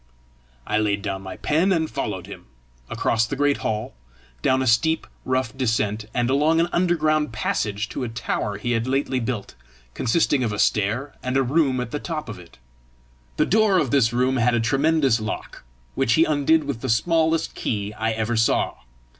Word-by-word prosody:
I 105 - 0
laid 100 -2 0
down 95 -2 -3
my 95 -1 -8
pen 165 +6 +1
and 160 -3 +1
followed - - -4
him - - -11 0.4
across 115 0 +1
the 135 - -3
great 145 +1 +2
hall, 110 0 -3 0.5
down 130 - +2
a - - -2
steep 155 +7 +2 0.2
rough 130 -1 -1
descent, 110 -4 -1
and 120 -1 0
along 150 +5 +3
an 170 +1 +2
underground 155 -5 +1
passage 105 -1 -2
to - - -4
a 120 - -3
tower 115 -3 -3
he 120 +4 -3
had 115 +1 0
lately 135 0 0
built, 115 -3 -4 0.4
consisting 135 +1 +1
of 115 - -1
a 105 - -3
stair 110 +8 0
and 130 +1 -1
a 135 - +3
room 135 -1 +1
at 120 -2 -4
the 150 - -3
top 155 -6 -5
of 105 - -7
it. 85 -6 -16 0.8
The 150 - +3
door 215 0 +3
of 140 -9 +1
this 125 -5 +3
room 130 +2 +1
had 120 0 +2
a - - +2
tremendous 135 +1 +2
lock, 110 0 -6 0.3
which 115 - +1
he 160 - +5
undid 155 +1 +2
with 140 -5 -4
the 130 - -3
smallest 160 +7 +1
key 105 -1 -3
I 110 +1 -1
ever 110 +1 -1
saw. 115 0 +1
130 Hz, 190 wpm, -23 LUFS, 110-150 Hz, 0.8 s, he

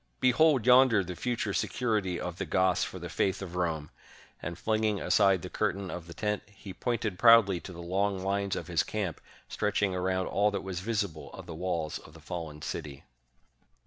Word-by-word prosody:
"Behold 130 -1 +4
yonder 125 -5 +6
the 90 0 -6
future 115 -1 -2
security 105 -9 0
of 90 -1 -5
the - - -1
Goths 95 0 +2
for - - -5
the 90 -1 -6
faith 95 +2 0
of 90 -3 -7
Rome! 80 -4 -2 0.2
" - - -25
and 85 +1 -5
flinging 110 -1 0
aside 95 -4 +3
the - - -4
curtain 95 0 -1
of 90 -1 -7
the 85 - -9
tent, 105 -1 -1
he 100 -1 -11
pointed 115 -5 -2
proudly 115 -6 +7
to 90 - -9
the 85 -1 -8
long 95 +3 0
lines 100 0 0
of - - -4
his 85 -3 +1
camp, 100 -6 -3 0.3
stretching 105 -2 0
around 95 0 0
all 105 +1 +2
that 100 -2 -3
was 95 -2 -4
visible 100 -6 -3
of - - -9
the 85 - -7
walls 85 -2 -2
of - - -16
the - - -12
fallen 80 -4 -6
city. 75 -4 -5
95 Hz, 195 wpm, -29 LUFS, 90-105 Hz, 0.3 s, proudly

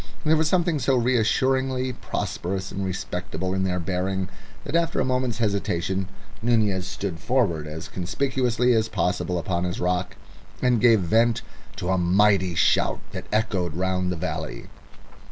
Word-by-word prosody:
There 155 +1 +5
was 160 0 +2
something 170 -2 +2
so 135 +1 +2
reassuringly 130 +2 +1
prosperous 95 -3 -3
and 100 - -3
respectable 95 0 -3
in 95 0 0
their 90 -1 0
bearing 95 +1 -2 0.3
that - - -4
after 170 0 +1
a - - +2
moment's 125 -3 0
hesitation 95 -4 -1 0.3
Nunez 105 -6 +2
stood 95 -5 -4
forward 90 - +1
as 80 +1 -6
conspicuously 125 +5 0
as 110 -1 +2
possible 90 -1 0
upon 85 0 -1
his 90 +1 -2
rock, 90 0 -1 0.4
and 125 -3 +2
gave 115 -4 +6
vent 115 +6 +2 0.3
to 90 -2 -4
a 95 0 +2
mighty 95 0 +3
shout - - +3
that - - -7
echoed 95 -6 0
round 90 0 0
the - - -1
valley. 80 - -4
100 Hz, 150 wpm, -24 LUFS, 90-125 Hz, 0.4 s, gave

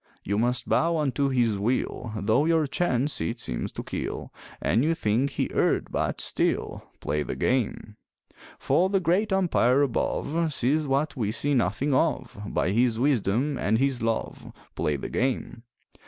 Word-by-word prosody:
You 100 +2 -1
must 120 +2 0
bow 165 +1 +2
unto 140 -2 0
his 120 -6 +1
will 120 +1 -1
Though 110 +8 +2
your 165 -1 +3
chance 140 -2 0
it 115 +1 -2
seems - - -3
to - - -5
kill, - - -5 0.3
And 120 - +1
you 165 +2 +2
think 125 +3 0
he - - -1
erred, - - +1
but - - -1
still - - -1 0.2
Play 75 - -1
the - - -4
game! 110 -4 -1 0.6
For 185 +2 +2
the 195 0 +2
Great 185 +5 +1
Umpire 145 -8 +3
above 155 +4 -1
Sees 145 +3 +1
what 140 +2 0
we 105 -5 -1
see 145 +5 +1
nothing 125 +4 +1
of, 145 +1 0
By 90 - 0
His 115 +1 +2
wisdom 130 +1 +1
and 110 +3 +1
His 135 0 0
love 115 0 -3 0.2
Play 75 - -1
the 70 - -5
game! 125 -2 -2
130 Hz, 160 wpm, -26 LUFS, 115-150 Hz, 0.6 s, your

